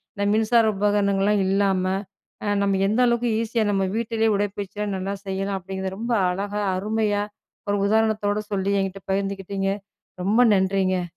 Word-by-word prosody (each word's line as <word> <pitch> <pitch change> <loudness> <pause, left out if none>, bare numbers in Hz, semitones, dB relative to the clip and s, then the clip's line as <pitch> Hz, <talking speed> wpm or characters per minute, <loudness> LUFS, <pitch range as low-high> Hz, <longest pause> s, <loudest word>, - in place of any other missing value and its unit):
இந்த 200 0 -1
மின்சார 225 +1 +3
உபகரணங்கள்லாம் 200 0 +2
இல்லாம, 195 -1 +2 0.8
நம்ம 195 -1 +2
எந்த 220 +4 +1
அளவுக்கு 235 0 +1
ஈஸியா 230 0 0
நம்ம 195 -1 +1
வீட்லேயே 225 -1 0
உடற்பயிற்சி 205 0 -3
எல்லாம் 205 -2 -1
நல்லா 195 +2 -3
செய்யலாம் 195 +1 -2
அப்படிங்குறத 190 +1 -5
ரொம்ப 235 +2 -2 0.2
அழகா, 205 +3 -2 0.2
அருமையா 210 0 0 0.5
ஒரு 205 - +2
உதாரணத்தோட 215 -1 +1
சொல்லி 195 0 0
என்கிட்ட 195 0 -3
பகிர்ந்துக்கிட்டீங்க, 195 0 -2 0.5
ரொம்ப 215 +6 +3
நன்றிங்க! 190 -1 +1
200 Hz, 135 wpm, -23 LUFS, 195-215 Hz, 0.8 s, மின்சார